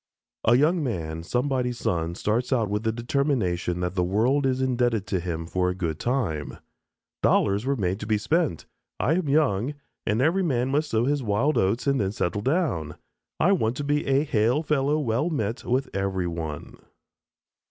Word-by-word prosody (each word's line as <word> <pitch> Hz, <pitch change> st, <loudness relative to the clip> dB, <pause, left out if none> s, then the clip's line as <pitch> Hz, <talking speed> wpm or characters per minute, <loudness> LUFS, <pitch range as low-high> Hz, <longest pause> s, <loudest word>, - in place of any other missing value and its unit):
A 115 Hz, -, +6 dB
young 160 Hz, +4 st, +3 dB
man, 80 Hz, -, -3 dB
somebody's 125 Hz, +5 st, -1 dB
son, 85 Hz, -4 st, -1 dB
starts 115 Hz, +7 st, -1 dB
out 115 Hz, -6 st, +1 dB
with 105 Hz, 0 st, 0 dB
the 110 Hz, 0 st, 0 dB
determination 115 Hz, -, -1 dB
that 90 Hz, 0 st, -1 dB
the 90 Hz, -2 st, +1 dB
world 120 Hz, +10 st, +2 dB
is 130 Hz, 0 st, 0 dB
indebted 120 Hz, -5 st, +1 dB
to 95 Hz, -2 st, -1 dB
him 85 Hz, -2 st, -4 dB
for 90 Hz, +2 st, 0 dB
a 90 Hz, -, -2 dB
good 80 Hz, -4 st, -3 dB
time. 105 Hz, -, -2 dB, 0.6 s
"Dollars 100 Hz, +5 st, +2 dB
were 140 Hz, -, +2 dB
made 95 Hz, -4 st, -1 dB
to 110 Hz, 0 st, 0 dB
spend. 150 Hz, -, 0 dB, 0.3 s
I 150 Hz, -, +2 dB
am 170 Hz, -4 st, 0 dB
young, 140 Hz, -3 st, +2 dB, 0.3 s
and 105 Hz, +2 st, +1 dB
every 165 Hz, +8 st, +3 dB
man 130 Hz, -7 st, 0 dB
must 150 Hz, +2 st, +1 dB
sow 115 Hz, +1 st, +1 dB
his 145 Hz, +1 st, +1 dB
wild 120 Hz, +7 st, +1 dB
oats 100 Hz, +6 st, +1 dB
and 140 Hz, -3 st, +2 dB
then 95 Hz, 0 st, -1 dB
settle 100 Hz, 0 st, -1 dB
down. 130 Hz, -, 0 dB, 0.4 s
I 180 Hz, -, +4 dB
want 125 Hz, -, +1 dB
to 145 Hz, -, -3 dB
be 145 Hz, +1 st, 0 dB
a 135 Hz, +1 st, +3 dB
'hail 125 Hz, +1 st, +1 dB
fellow 150 Hz, -1 st, +1 dB
well 135 Hz, +2 st, 0 dB
met' 115 Hz, -6 st, -2 dB
with 130 Hz, +3 st, 0 dB
every 95 Hz, -2 st, -1 dB
one." 80 Hz, -4 st, -5 dB
120 Hz, 180 wpm, -25 LUFS, 95-140 Hz, 0.6 s, A